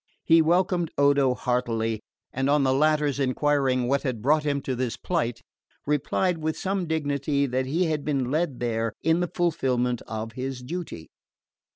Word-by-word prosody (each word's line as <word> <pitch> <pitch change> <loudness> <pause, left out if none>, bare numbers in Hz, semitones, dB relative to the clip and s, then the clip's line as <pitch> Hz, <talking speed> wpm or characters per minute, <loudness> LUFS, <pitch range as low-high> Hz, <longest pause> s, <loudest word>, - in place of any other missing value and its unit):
He 165 0 +5
welcomed 175 +1 +2
Odo 140 -2 +4
heartily, 115 -3 -1 0.3
and 135 +2 0
on 145 0 +3
the 130 -1 +3
latter's 150 0 +2
enquiring 135 -2 +1
what 140 +2 +1
had 130 -5 -3
brought 150 +7 +3
him 145 -1 0
to 130 -1 -3
this 125 -1 -2
plight, 155 -10 -2 0.4
replied 160 +5 0
with 155 0 -2
some 190 -2 -2
dignity 145 -2 0
that 130 0 -1
he 165 +7 +1
had 155 -3 -1
been 135 -4 -1
led 155 -4 -1
there 115 -2 -1
in 160 +2 +3
the 175 - 0
fulfilment 125 -8 0
of 110 0 -5
his 130 +1 -5
duty. 145 - -6
140 Hz, 165 wpm, -25 LUFS, 125-155 Hz, 0.4 s, He